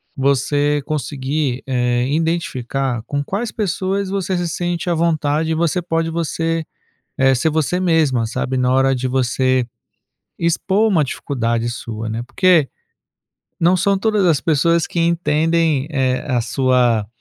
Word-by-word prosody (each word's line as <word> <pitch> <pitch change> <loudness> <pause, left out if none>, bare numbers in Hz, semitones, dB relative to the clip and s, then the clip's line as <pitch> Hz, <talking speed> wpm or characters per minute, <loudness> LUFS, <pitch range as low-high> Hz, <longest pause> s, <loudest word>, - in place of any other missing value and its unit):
você 145 +2 +1
conseguir, 140 -3 -2
eh, 125 -2 0
identificar 135 -6 -1
com 145 0 -2
quais 205 +9 -3
pessoas 195 -1 -2
você 190 -2 -1
se 175 - -1
sente 175 +1 -3
à 175 - +2
vontade 160 -1 0
e - - +1
você 170 +2 0
pode 165 -1 -1
você 165 0 -1 0.5
eh, 135 -1 +4
ser 160 +6 +1
você 160 +3 0
mesma, 155 -10 +2
sabe, 125 +3 -3
na 125 0 +2
hora 135 0 +3
de 125 +1 -2
você 130 0 +1 0.7
expor 190 +6 +1
uma 165 -7 +3
dificuldade 120 -4 -2
sua, 115 -2 -6
né. 110 +1 -3
Porque, 175 -5 +3 0.9
não 175 +2 +4
são 200 +2 +2
todas 210 -1 +1
as 160 -5 +3
pessoas 165 +1 +2
que 170 - -3
entendem, 165 -3 +1
eh, 130 -3 0
a 125 -3 +1
sua 125 -3 +1
150 Hz, 145 wpm, -19 LUFS, 130-170 Hz, 0.9 s, eh